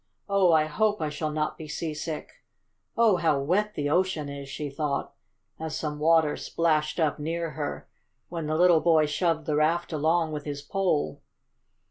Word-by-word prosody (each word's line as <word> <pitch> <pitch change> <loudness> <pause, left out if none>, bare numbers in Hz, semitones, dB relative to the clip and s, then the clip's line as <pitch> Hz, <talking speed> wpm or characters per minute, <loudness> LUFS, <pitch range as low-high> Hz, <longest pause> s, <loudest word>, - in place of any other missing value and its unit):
Oh, 200 -3 +4
I 155 -1 +4
hope 210 +7 +1
I 155 - -1
shall 155 +1 -3
not 155 0 -2
be 155 - -7
seasick! 155 0 -5 0.5
Oh, 225 -5 +5
how 160 -4 +2
wet 205 +9 0
the 145 0 -1
ocean 175 -4 +1
is!" 140 -1 -7
she 145 +2 -4
thought, 140 0 -3 0.5
as 160 -1 -4
some 150 -1 -4
water 160 -1 +4
splashed 155 -1 0
up 155 -2 +1
near 165 +2 -2
her, 150 -2 -5 0.4
when 165 -3 -4
the 155 +1 0
little 175 -2 +5
boy 160 -2 +4
shoved 160 +1 0
the 155 -2 0
raft 165 +3 +1
along 160 +2 +1
with 150 -1 -4
his 145 -1 -5
pole. 190 -4 -1
155 Hz, 170 wpm, -27 LUFS, 150-170 Hz, 0.5 s, Oh